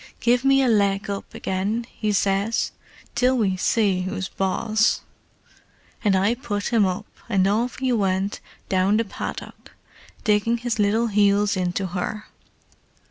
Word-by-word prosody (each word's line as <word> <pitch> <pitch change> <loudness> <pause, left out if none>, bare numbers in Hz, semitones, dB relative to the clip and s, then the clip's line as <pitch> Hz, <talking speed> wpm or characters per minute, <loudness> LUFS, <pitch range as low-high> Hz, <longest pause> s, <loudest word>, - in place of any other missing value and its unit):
'Give 240 +1 +2
me 270 0 +4
a - - +2
leg 200 -3 +2
up 200 - -6
again,' 200 +5 -2
he 215 -1 -2
says, 200 +2 +1 0.4
'till 255 +2 +2
we 200 -5 +1
see 195 0 +1
who's 185 +1 -4
boss!' 215 +4 +1 1.0
And 205 -3 +3
I 195 +4 +3
put 210 -5 -3
him 215 -4 +4
up, 185 +3 -3 0.2
and 195 -3 +3
off 230 +5 0
he 260 -1 0
went 195 -2 0 0.3
down 190 +2 +2
the 230 - +1
paddock, 195 - -7 0.5
digging 215 +2 +2
his 235 -1 -3
little 210 +3 +2
heels 205 -1 +3
into 185 +1 -1
her. 185 +4 -4
205 Hz, 140 wpm, -23 LUFS, 195-230 Hz, 1.0 s, me